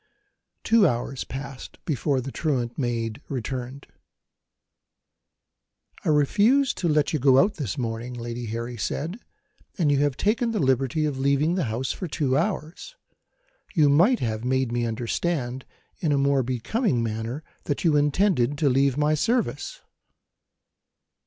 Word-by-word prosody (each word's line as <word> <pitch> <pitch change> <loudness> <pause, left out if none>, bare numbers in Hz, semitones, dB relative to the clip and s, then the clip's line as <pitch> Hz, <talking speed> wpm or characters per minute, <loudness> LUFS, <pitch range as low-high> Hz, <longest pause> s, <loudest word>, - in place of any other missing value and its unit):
Two 225 -4 +5
hours 125 0 -2
passed 135 0 -8
before 140 -3 0
the 135 +2 -6
truant 125 -7 -1
maid 120 -2 -2
returned. 130 0 -5 2.2
"I - - 0
refused 210 - +3
to 175 - 0
let 150 0 +2
you 155 - +1
go 130 0 +5
out 200 +9 +3
this 135 - -3
morning," 120 0 -4
Lady 120 0 -5
Harry 115 +2 -4
said; 160 - -3 0.6
"and 160 -6 +2
you 140 - +3
have 145 -2 +1
taken 230 +3 +1
the 215 - 0
liberty 135 +2 +1
of 140 -3 -2
leaving 140 +4 +2
the 180 -4 0
house 120 +3 -2
for 185 - -5
two 145 -4 0
hours. 170 - -2 0.8
You 150 -4 +5
might 180 - +4
have 110 -1 -2
made 130 -1 0
me 120 0 0
understand, 125 +3 -2 0.3
in 160 - 0
a 140 - +3
more 140 0 +3
becoming 130 - 0
manner, 115 +6 -4 0.2
that 145 - -2
you 160 -4 +3
intended 145 -2 +2
to 145 -1 +2
leave 135 +1 +2
my 150 +1 +2
service." 240 - -1
140 Hz, 145 wpm, -25 LUFS, 120-160 Hz, 2.2 s, Two